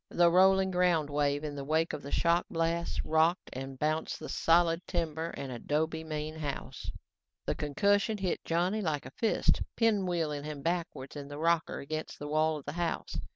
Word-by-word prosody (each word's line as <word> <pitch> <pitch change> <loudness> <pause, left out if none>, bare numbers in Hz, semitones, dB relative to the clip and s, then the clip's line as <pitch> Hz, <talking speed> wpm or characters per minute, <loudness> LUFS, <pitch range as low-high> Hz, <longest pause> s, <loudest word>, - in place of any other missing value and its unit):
The 175 -1 +4
rolling 190 +1 +5
ground 175 -5 +2
wave 145 0 +1
in 150 -1 -3
the 140 - -5
wake 160 +3 +1
of - - -4
the 140 - -8
shock 170 +1 +2
blast, 165 0 -1
rocked 160 +3 +2
and 135 +1 -6
bounced 155 +3 -1
the - - -7
solid, 165 0 +3
timber 165 -1 -2
and 135 -2 -5
adobe 160 +6 -1
main 155 0 -4
house. 145 -3 -5 0.6
The - - 0
concussion 200 +8 +1
hit 190 -3 -2
Johnny 180 +6 +1
like 155 -6 -1
a 130 - -8
fist, 225 - +1 0.2
pinwheeling 175 -10 +1
him 150 -2 -6
backwards 165 -6 -2
in 145 -1 -6
the 145 0 -7
rocker 165 +1 +1
against 155 +3 -5
the 145 - -6
wall 155 +1 +2
of 145 - -11
the - - -3
house. 165 -2 -2
160 Hz, 180 wpm, -31 LUFS, 145-175 Hz, 0.6 s, rolling